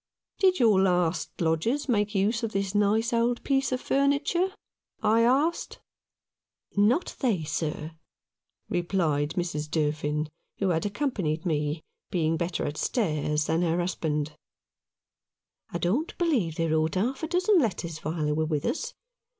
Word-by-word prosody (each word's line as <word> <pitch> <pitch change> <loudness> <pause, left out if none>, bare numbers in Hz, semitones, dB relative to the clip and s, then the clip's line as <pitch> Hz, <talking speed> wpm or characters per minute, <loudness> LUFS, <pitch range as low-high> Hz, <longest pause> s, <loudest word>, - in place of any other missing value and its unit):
" - - -50
Did 375 -2 +4
your 215 -6 +5
last 180 -3 +1
lodgers 170 - 0
make 210 -3 +1
use 210 +4 +2
of 225 -2 -3
this 195 0 -1
nice 210 +3 +2
old 235 +1 +1
piece 270 -1 +1
of 255 - 0
furniture? 285 +8 +1 0.3
" - - -40
I - - +5
asked. 275 +8 +1 1.0
"Not 225 - +2
they, 215 - +1
sir," 155 +1 -3 0.8
replied 165 -4 0
Mrs. 170 -4 -2
Durfin, 150 -1 0 0.3
who 195 - +1
had 165 +2 +1
accompanied 200 - -2
me, 150 -1 -1 0.3
being 165 -2 +1
better 170 +2 -2
at 145 +1 -3
stairs 150 - 0
than 160 +2 +1
her 170 -1 +1
husband. 155 -4 -1 1.4
"I - - -3
don't 220 - -1
believe 255 - +1
they 165 0 0
wrote 160 +1 +1
half 245 +8 0
a 320 - -2
dozen 365 +3 +3
letters 175 - -2
while 155 0 -2
they 150 - +1
were 155 +1 +1
with 150 -2 -1
us. - - -2
180 Hz, 150 wpm, -27 LUFS, 155-240 Hz, 1.4 s, your